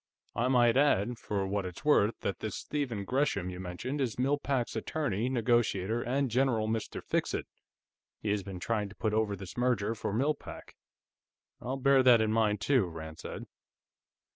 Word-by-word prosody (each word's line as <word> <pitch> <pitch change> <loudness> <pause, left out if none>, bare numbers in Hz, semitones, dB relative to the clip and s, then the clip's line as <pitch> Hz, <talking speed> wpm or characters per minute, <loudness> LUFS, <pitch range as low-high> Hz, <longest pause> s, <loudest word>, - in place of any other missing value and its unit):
I 120 +3 0
might 120 -2 +4
add, 120 -5 +2
for 100 -2 -2
what 100 +1 -1
it's 90 - -8
worth, 115 -7 +3
that 100 - -2
this 110 -3 -4
Stephen 125 -9 -3
Gresham 130 -7 0
you 90 - -7
mentioned 95 +11 -4
is 120 -5 -1
Mill 135 +3 +1
Pack's 130 -5 -1
attorney, 120 -2 -1
negotiator, 120 -3 +1
and 130 +1 0
general 120 -3 +2
Mr. 110 0 -3
Fixit; - - -1 0.7
he 105 - -1
has 105 -1 0
been 95 -1 -7
trying 105 +1 -1
to 100 - -14
put 110 -2 -1
over 110 -2 +1
this 95 -2 -9
merger 120 -3 +1
for 105 - -4
Mill 135 +9 +2
Pack." - - -11 0.9
"I'll 130 +2 -3
bear 135 0 +5
that 125 -2 +7
in 110 -1 +1
mind, 105 -2 +2
too," 125 -2 +3
Rand 80 -1 -8
said. - - -7
115 Hz, 175 wpm, -31 LUFS, 100-130 Hz, 0.9 s, that